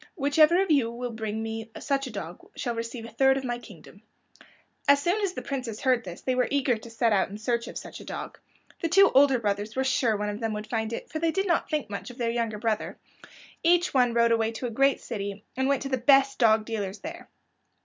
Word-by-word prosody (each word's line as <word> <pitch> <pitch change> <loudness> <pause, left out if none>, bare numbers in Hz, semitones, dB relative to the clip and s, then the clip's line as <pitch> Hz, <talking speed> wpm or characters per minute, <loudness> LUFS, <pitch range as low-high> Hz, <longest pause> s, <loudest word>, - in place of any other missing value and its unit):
Whichever 310 +3 +4
of 385 -3 +1
you 270 -6 +3
will 240 +1 -5
bring 220 -1 -4
me 225 0 -5
such 275 -1 -1
a - - -7
dog 185 -5 -7 0.2
shall 240 - -2
receive 230 0 -5
a 230 - -10
third 265 +3 +3
of 270 - -4
my 240 -1 -3
kingdom." 200 -3 -14 0.9
As 280 0 +6
soon 350 +8 0
as 395 -3 -1
the - - -6
princes 255 -6 -4
heard 255 -3 +2
this 175 -2 -8
they 255 - 0
were 250 0 +1
eager 275 -3 +2
to 220 +1 -10
set 230 -1 +1
out 195 -2 +2
in 205 - -7
search 235 +2 -1
of - - -7
such - - -8
a - - -10
dog. - - -7 0.4
The 330 - 0
two 390 +4 +6
older 270 -1 +6
brothers 205 -1 -2
were 265 - +1
sure 245 -4 +1
one 210 0 -2
of 210 0 -4
them 225 -2 -2
would 210 0 -5
find 220 0 -2
it, 230 - -6
for 315 - -3
they 330 +1 +1
did 385 +4 0
not 345 -3 +1
think 300 -6 -1
much 200 - -5
of 245 - -11
their 235 -2 0
younger 230 -2 -2
brother. 220 0 -2 0.6
Each 350 +1 +3
one 245 -3 +3
rode 235 0 +4
away 225 -1 +2
to 235 - -5
a 240 - -3
great 275 +4 +3
city, 200 -3 -5
and 265 +1 0
went 280 0 +1
to 275 - -4
the 260 - +1
best 270 +2 +4
dog 220 -2 +4
dealers 210 -3 -4
there. 330 +2 -8
240 Hz, 245 wpm, -27 LUFS, 220-275 Hz, 0.9 s, As